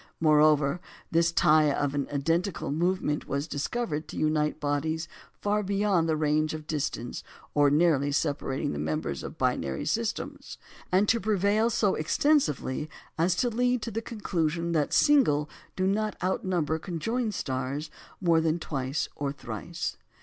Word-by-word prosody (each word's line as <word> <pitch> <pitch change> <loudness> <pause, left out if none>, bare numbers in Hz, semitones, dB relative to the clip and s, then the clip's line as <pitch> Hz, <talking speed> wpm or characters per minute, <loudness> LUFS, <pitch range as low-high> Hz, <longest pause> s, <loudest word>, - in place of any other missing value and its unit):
Moreover, 150 0 +4 0.3
this 165 0 +3
tie 155 -2 +4
of 140 0 0
an 140 -1 -1
identical 165 +3 -1
movement 170 -1 0
was 140 +2 -2
discovered 155 +1 -2
to - - -8
unite 155 -1 +1
bodies 155 +3 -1 0.2
far 210 +1 -1
beyond 195 -4 +1
the 160 - +2
range 155 +1 +1
of 155 -1 -8
distance 140 -5 -3 0.3
ordinarily 145 0 +4
separating 140 - -1
the 70 - -4
members 75 +1 -2
of - - -8
binary 65 0 -1
systems, - - -3 0.3
and 190 +3 +3
to 230 - +3
prevail 210 +2 +2
so 220 -4 +2
extensively 155 - +1 0.3
as 175 +2 +3
to 245 +7 +1
lead 245 +1 +1
to 230 - -4
the 225 +2 -2
conclusion 170 -7 -2
that 155 -3 +1
single 235 - +4 0.3
do 185 - 0
not 210 +2 0
outnumber 180 -4 0
conjoined 210 +7 -2
stars 135 +3 -3 0.3
more 170 -3 +3
than 160 0 +1
twice 140 -3 -2
or 140 -1 -2
thrice. 115 - -5
160 Hz, 140 wpm, -28 LUFS, 145-195 Hz, 0.3 s, Moreover